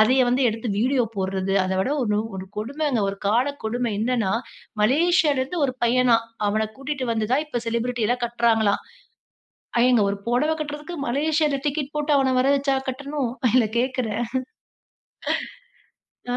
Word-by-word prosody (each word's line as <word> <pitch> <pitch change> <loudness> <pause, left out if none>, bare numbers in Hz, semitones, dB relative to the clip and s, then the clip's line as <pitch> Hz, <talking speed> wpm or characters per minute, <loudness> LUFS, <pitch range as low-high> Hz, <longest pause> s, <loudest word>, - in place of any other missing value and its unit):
அதைய 255 +5 +5
வந்து 250 +2 +2
எடுத்து 225 +2 -3
வீடியோ 250 +2 +2
போட்றது. 190 0 -1
அத 185 - -2
விட 225 - 0
ஒரு 210 -3 +1 0.2
ஒரு 190 0 -6
கொடுமைங்க. 270 +3 -1
ஒரு 200 - -7
கால 235 +5 +3 0.2
கொடுமை 235 +1 -1
என்னனன்னா, 225 -4 +1 0.5
மலேசியால 305 +4 +3
இருந்து 270 +7 -3
ஒரு 255 - -3
பையனாம், 235 -1 +3 0.2
அவன 215 +1 0
கூட்டிட்டு 270 -1 -3
வந்துதான் 230 +7 0
இப்ப 240 -6 -3
செலிபிரிட்டி 235 0 -1
எல்லாம் 245 +1 0
கட்றாங்களாம். 230 -3 +2 1.0
ஏங்க, 250 -3 +4
ஒரு 200 - -3
புடவை 280 +7 +2
கட்றதுக்கு 300 +3 -5
மலேசியால 295 +2 +1
டிக்கெட் 290 0 -2
போட்டு 295 0 0
அவன 265 -1 +2
வரவச்சா 275 +1 +2
கட்டணும்? 280 -1 -3 0.2
இல்ல 250 -3 +5
கேக்கிறேன்? 240 -3 -1 2.1
ஆ. - - +1
250 Hz, 140 wpm, -23 LUFS, 225-280 Hz, 2.1 s, அதைய